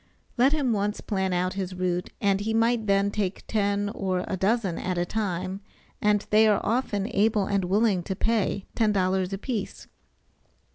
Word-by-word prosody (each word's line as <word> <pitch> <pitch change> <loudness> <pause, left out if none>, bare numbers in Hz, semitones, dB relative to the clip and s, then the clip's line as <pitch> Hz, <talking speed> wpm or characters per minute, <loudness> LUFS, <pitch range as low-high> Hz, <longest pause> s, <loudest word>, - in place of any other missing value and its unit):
Let 260 +3 +4
him 285 -6 +1
once 205 0 -1
plan 190 -3 -1
out 180 +1 0
his 190 -1 -4
route, 180 -1 -1
and 195 -1 +2
he 220 +2 -1
might 230 -1 +2
then 200 0 +2
take 200 -2 -3
ten 205 -1 0
or 185 -3 -2
a - - -2
dozen 195 -1 0
at 185 -1 -2
a 175 - +1
time, 185 -1 -3 0.4
and 210 -1 +2
they 215 +1 +6
are 210 -2 +3
often 215 -4 0
able 210 0 +2
and 200 -2 0
willing 200 0 +2
to 190 - -3
pay 210 -2 0
$10 190 -4 +1
a 195 - -2
piece. 215 -1 -4
200 Hz, 175 wpm, -26 LUFS, 190-220 Hz, 0.4 s, they